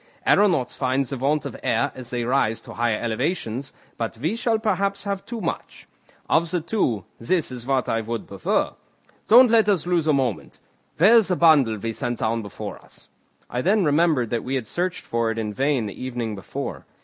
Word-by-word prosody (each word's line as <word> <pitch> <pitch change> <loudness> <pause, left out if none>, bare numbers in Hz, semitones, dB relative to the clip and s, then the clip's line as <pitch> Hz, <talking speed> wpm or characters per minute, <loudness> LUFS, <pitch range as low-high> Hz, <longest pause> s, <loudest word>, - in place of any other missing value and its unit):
Aeronauts 170 -12 +3
find 130 +1 0
the 135 - -4
want 140 +4 0
of - - -5
air 140 - +1
as 130 -2 -7
they 120 -1 -2
rise 120 -3 +1
to - - -11
high 120 -2 +1
elevations, 125 +2 -2 0.3
but 115 -1 -3
we 160 - -1
shall 230 -1 +1
perhaps 200 -2 0
have 200 -1 -3
too 235 -1 -5
much: - - -5 0.4
of 165 +1 +2
the 180 +1 0
two, 155 - -1
this 155 +5 0
is 125 -1 -7
what 135 -3 +1
I 115 - 0
should 115 +1 -4
prefer. 100 -2 0 0.6
Don't 245 +1 +7
let 225 -2 +4
us 185 -6 +1
lose 175 -3 +1
a - - +5
moment. 130 -6 -2 0.4
Where 210 +9 +7
is 220 - +4
the 180 - +1
bundle 145 -10 +4
we 115 +2 -4
sent 120 0 -3
down 115 +1 -1
before 100 -2 -7
us?" - - -16 0.4
I 125 - -3
then 195 +4 +2
remembered 150 -5 +2
that 115 -2 -1
we 130 +2 -2
had 130 -4 -2
searched 180 - -3
for 115 -1 0
it 115 - -3
in 105 -2 -3
vain 135 0 +1
the 105 +4 -7
evening 120 -3 -3
before. 95 -3 -6
135 Hz, 200 wpm, -23 LUFS, 115-180 Hz, 0.6 s, Don't